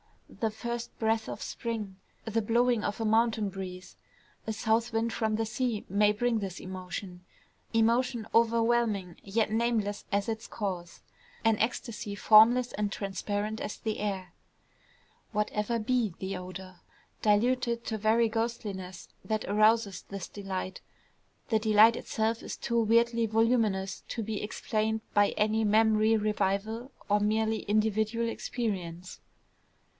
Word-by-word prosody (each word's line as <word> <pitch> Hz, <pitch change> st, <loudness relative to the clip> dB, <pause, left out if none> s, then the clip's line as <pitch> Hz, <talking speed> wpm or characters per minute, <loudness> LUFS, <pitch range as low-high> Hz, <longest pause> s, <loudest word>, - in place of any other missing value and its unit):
The 225 Hz, -, -1 dB
first 235 Hz, +2 st, -5 dB
breath 220 Hz, 0 st, 0 dB
of 205 Hz, -, -6 dB
spring, 215 Hz, -5 st, -4 dB, 0.3 s
the 225 Hz, 0 st, 0 dB
blowing 235 Hz, +1 st, +2 dB
of 205 Hz, -, -2 dB
a 225 Hz, -, -1 dB
mountain 220 Hz, -1 st, +2 dB
breeze, 185 Hz, -1 st, -8 dB, 0.5 s
a 220 Hz, -, -1 dB
south 225 Hz, +2 st, +1 dB
wind 225 Hz, 0 st, 0 dB
from 220 Hz, +1 st, 0 dB
the 225 Hz, +1 st, 0 dB
sea 225 Hz, -1 st, -2 dB
may 205 Hz, +2 st, +4 dB
bring 230 Hz, +2 st, 0 dB
this 190 Hz, -3 st, -5 dB
emotion, 185 Hz, 0 st, -7 dB, 0.5 s
emotion 230 Hz, +1 st, +2 dB
overwhelming, 230 Hz, -5 st, +2 dB
yet 215 Hz, +2 st, 0 dB
nameless 220 Hz, -3 st, 0 dB
as 200 Hz, 0 st, +1 dB
its 225 Hz, 0 st, -3 dB
cause, 185 Hz, -5 st, -5 dB, 0.4 s
an 225 Hz, -2 st, +3 dB
ecstasy 225 Hz, -2 st, -2 dB
formless 230 Hz, +5 st, +6 dB
and 205 Hz, -1 st, -1 dB
transparent 205 Hz, +2 st, -3 dB
as 210 Hz, -, -4 dB
the 220 Hz, -1 st, -3 dB
air. 190 Hz, -4 st, -3 dB, 1.0 s
Whatever 210 Hz, +2 st, 0 dB
be 225 Hz, -4 st, 0 dB
the 190 Hz, +1 st, -4 dB
odor, 185 Hz, 0 st, -8 dB, 0.4 s
diluted 235 Hz, +2 st, +2 dB
to 220 Hz, -, -2 dB
very 225 Hz, +2 st, +3 dB
ghostliness, 210 Hz, -5 st, -4 dB
that 215 Hz, -1 st, -2 dB
arouses 215 Hz, -1 st, +3 dB
this 195 Hz, -3 st, -5 dB
delight, 190 Hz, -2 st, -5 dB, 0.7 s
the 220 Hz, -, +3 dB
delight 215 Hz, +1 st, +6 dB
itself 225 Hz, 0 st, -1 dB
is -, -, -6 dB
too 235 Hz, 0 st, 0 dB
weirdly 230 Hz, +1 st, +3 dB
voluminous 220 Hz, -4 st, +1 dB
to 230 Hz, -, -3 dB
be 215 Hz, -1 st, -3 dB
explained 215 Hz, +1 st, -1 dB
by 205 Hz, -1 st, +4 dB
any 215 Hz, +1 st, +1 dB
memory 220 Hz, +1 st, +4 dB
revival 215 Hz, +4 st, -1 dB, 0.2 s
of 205 Hz, 0 st, +2 dB
merely 220 Hz, +1 st, +1 dB
individual 215 Hz, +2 st, +1 dB
experience. 185 Hz, -7 st, -4 dB
215 Hz, 130 wpm, -29 LUFS, 200-230 Hz, 1.0 s, formless